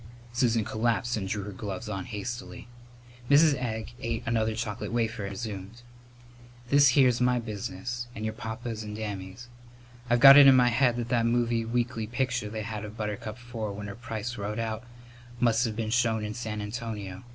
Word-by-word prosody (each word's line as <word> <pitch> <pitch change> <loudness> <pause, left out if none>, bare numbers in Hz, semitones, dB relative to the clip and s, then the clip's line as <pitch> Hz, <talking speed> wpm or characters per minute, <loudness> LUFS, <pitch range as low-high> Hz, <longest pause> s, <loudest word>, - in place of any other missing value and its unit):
Susan 115 -3 +2
collapsed 120 +2 0
and 100 -3 -3
drew 100 +1 -2
her 105 - -6
gloves 100 +2 -6
on 95 -3 -4
hastily. 120 +4 -6 0.6
Mrs. 150 +2 +6
Egg 115 -4 -3
ate 115 -1 -2
another 110 -1 0
chocolate 110 -3 -4
wafer 115 -3 -1
and - - -4
resumed: 110 +1 -7 0.9
"This 140 -1 +7
here's 125 -3 +5
my 125 0 +3
business 115 +1 -5
and 110 - -4
your 110 - -2
papa's 115 0 -5
and 105 -1 -6
Dammy's. 100 +1 -6 0.6
I've 120 0 +3
got 135 +2 +11
it 145 -1 +10
in 135 - +8
my 125 -1 +5
head 120 0 +3
that 120 -1 -3
that 120 -1 +2
movie 115 -1 +1
weekly 115 -1 -1
picture 120 -2 -1
they 110 0 -4
had 110 -1 -5
of 105 +1 -8
Buttercup 105 +1 -4
Four 115 -4 -5
with 105 +1 -6
her 100 - -6
price 115 0 -5
wrote 105 +1 -3
out 115 0 -3 0.6
must 120 0 +3
have 110 -2 -3
been 110 -1 -2
shown 115 -3 +1
in 105 - -4
San 110 -2 -4
Antonio. 105 -3 -5
115 Hz, 185 wpm, -28 LUFS, 105-120 Hz, 0.9 s, got